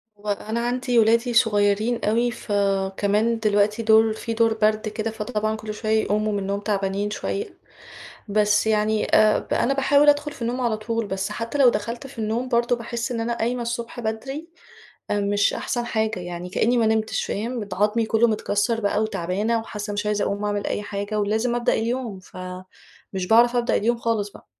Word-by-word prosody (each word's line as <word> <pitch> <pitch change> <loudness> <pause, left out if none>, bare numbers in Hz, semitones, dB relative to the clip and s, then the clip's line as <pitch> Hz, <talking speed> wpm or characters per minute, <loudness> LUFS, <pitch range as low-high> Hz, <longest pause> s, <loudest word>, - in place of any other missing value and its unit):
وأنا 210 +2 -3
عندي 250 0 0
أولادي 230 +2 +3
صغيرين 215 +1 +2
أوي، 235 +3 +2
فكمان 205 +1 0
دلوقتي 210 +1 +2
دور 220 0 +5
فيه 225 +1 -5
دور 225 -1 +3
برد 215 0 +1
كده، 220 +1 -3
فطبعًا 215 0 -2
كل 215 0 -6
شوي 215 +1 -5
يقوموا 215 -1 +1
من 205 - 0
النوم 200 +1 -2
تعبانين 200 0 -1
شوية، 395 - -4 0.7
بس 210 +1 +2
يعني 215 0 +2
آآ 215 0 +5
ب - - -5
أنا 270 - +2
باحاول 285 +2 +4
أدخل 295 +1 +2
في 275 - -13
النوم 245 +2 -2
على 230 -3 0
طول، 230 +1 -2
بس 190 +1 -2
حتى 230 +5 -4
لو 265 -3 +7
دخلت 235 +5 -4
في 255 -3 -11
النوم 225 +4 -1
برضه 240 0 +2
باحسّ 235 +1 -4
إن 230 - -2
أنا 235 +1 -2
قايمة 240 +2 -1
الصبح 235 0 -4
بدري 255 +8 -4 0.6
آآ 205 - +1
مش 205 0 +2
أحسن 240 -1 -2
حاجة، 220 -4 -1
يعني 175 0 -6
كأني 240 +6 +1
ما 230 - +3
نمتش 220 0 0
فاهم؟ 235 +4 -3
بت 205 -3 -5
عضمي 210 +4 +1
كله 225 +2 +3
متكسّر 215 +1 0
بقى 205 0 +1
وتعبانة 215 +2 -1
وحاسّة 210 -1 -6
مش 205 +1 -2
عايزة 210 -1 0
أقوم 200 +1 -2
أعمل 205 -1 -1
أي - - -1
حاجة، 205 +1 -3
ولازم 220 +4 0
أبدأ 240 - +1
اليوم، 230 -3 -2
فمش 185 0 -9
باعرف 240 +2 +5
أبدأ 240 -1 +1
اليوم 235 +3 +1
خالص 225 -3 -1
بقى. - - -16
220 Hz, 185 wpm, -23 LUFS, 205-235 Hz, 0.7 s, لو